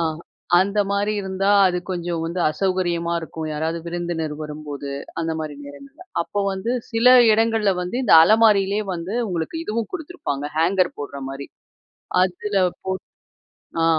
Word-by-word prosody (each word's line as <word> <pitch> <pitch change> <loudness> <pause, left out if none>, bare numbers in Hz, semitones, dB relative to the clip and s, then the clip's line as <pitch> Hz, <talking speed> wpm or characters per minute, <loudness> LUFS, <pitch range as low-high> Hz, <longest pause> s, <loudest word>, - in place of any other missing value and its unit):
ஆ. - - +1 0.6
அந்த 200 +2 0
மாரி 200 +1 +1
இருந்தா, 190 0 -1 0.2
அது 180 -1 +1
கொஞ்சம் 175 -2 -2
வந்து 170 +2 -3
அசௌகரியமா 175 0 -1
இருக்கும். 160 -1 -6
யாராவது 160 +2 -2
விருந்தினர் 170 -3 -3
வரும்போது, 150 -2 -7 0.3
அந்த 165 0 -1
மாரி 155 -2 -5
நேரங்கள்ல. 275 - -12 0.2
அப்போ 205 +4 -3
வந்து 190 +4 -3 0.2
சில 235 +3 +6 0.2
இடங்கள்ல 225 -1 +2
வந்து 180 +6 -4
இந்த 245 - +2
அலமாரியிலேயே 210 +1 +4
வந்து 175 +4 -5
உங்களுக்கு 170 - -3
இதுவும் 225 -3 -2
குடுத்துருப்பாங்க, 315 - -4
ஹேங்கர் 180 +3 +2
போடுற 140 -1 -6
மாரி. 135 +1 -7 0.8
அதுல 190 +3 -2 0.3
போ 190 - -4 0.9
ஆ. - - +3
180 Hz, 135 wpm, -22 LUFS, 160-205 Hz, 0.9 s, சில